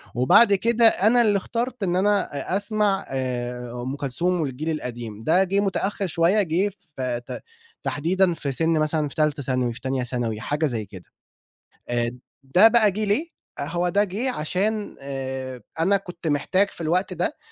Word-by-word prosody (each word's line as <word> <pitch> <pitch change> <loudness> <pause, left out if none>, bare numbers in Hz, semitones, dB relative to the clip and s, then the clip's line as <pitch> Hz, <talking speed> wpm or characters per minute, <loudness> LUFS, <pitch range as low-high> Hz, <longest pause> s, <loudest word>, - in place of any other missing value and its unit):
وبعد 165 - +6
كده 230 +4 +3
أنا 225 +4 +4
اللي 210 -3 +3
اخترت 235 +2 -3
إن 180 -1 0
أنا 205 +2 +2 0.3
أسمع 205 -1 0
آآ 125 -2 -3
،أُم 130 +3 -4
كلثوم 165 +6 0
والجيل 150 +2 -3
القديم، 120 -7 -5
ده 180 +4 +4
جه 195 +2 0
متأخر 195 0 -1
شوية 170 +5 +3
جه 190 +3 0 0.2
في 125 -2 -2
ت - - -6 0.4
تحديدًا 175 +4 +1
في 145 -3 -3
سن 160 +5 0
مثلًا 155 -1 +1
في - - -10
تالته 150 -2 0
ثانوي 125 -1 0
و - - -3
في 115 - -10
تانية 130 -1 -1
ثانوي 120 -3 -2
حاجة 145 +5 -1
زيّ 115 -7 -2
كده 95 -2 -12 0.9
آآ، 120 0 0 0.3
ده 180 +11 +6
بقى 225 -2 +5
جه 215 +3 -3
ليه؟ 260 +12 -1 0.3
هو 175 +5 -1
ده 200 +3 +3
جه 215 +7 -2
عشان 205 +5 -2
آآ، 130 -2 -5 0.2
أنا 195 +5 +3
كنت 180 -3 -8
محتاج 185 +7 +2
في - - -8
الوقت 175 +4 0
ده - - -2
165 Hz, 170 wpm, -24 LUFS, 130-200 Hz, 0.9 s, وبعد